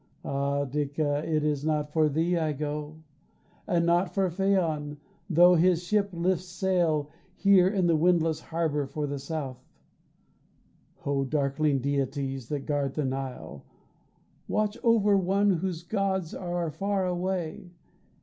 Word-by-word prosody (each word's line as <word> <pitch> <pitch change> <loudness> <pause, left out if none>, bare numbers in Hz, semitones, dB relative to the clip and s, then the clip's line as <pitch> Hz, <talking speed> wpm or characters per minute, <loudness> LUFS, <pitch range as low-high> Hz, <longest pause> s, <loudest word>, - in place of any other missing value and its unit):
Ah 140 +1 -1
Dica, 145 +1 -1
it 155 -2 0
is 150 -2 0
not 150 -1 -1
for 155 -2 +3
thee 165 +4 +1
I 160 -3 0
go; 150 +2 -5 0.6
And 170 -1 +2
not 175 +2 +1
for 190 -3 +1
Phaon, 165 -6 0 0.3
tho' 175 +1 +6
his 175 0 +3
ship 200 +2 +1
lifts 180 +1 0
sail 175 -5 0 0.2
Here 195 -3 +5
in 190 -2 +1
the 170 -1 +3
windless 165 -1 +2
harbor 160 -4 -2
for 150 +2 -3
the 140 -1 -4
south. 140 -3 -5 1.4
Oh, 140 -1 +1
darkling 140 0 0
deities 135 -2 -2
that 145 -2 -3
guard 145 -2 -1
the 150 - -1
Nile, 130 - -5 0.8
Watch 215 -1 0
over 220 -4 +4
one 195 +2 +2
whose 175 -1 -2
gods 190 -3 -1
are 175 -3 -3
far 195 +2 -1
away. 180 -1 -3
160 Hz, 135 wpm, -27 LUFS, 145-180 Hz, 1.4 s, tho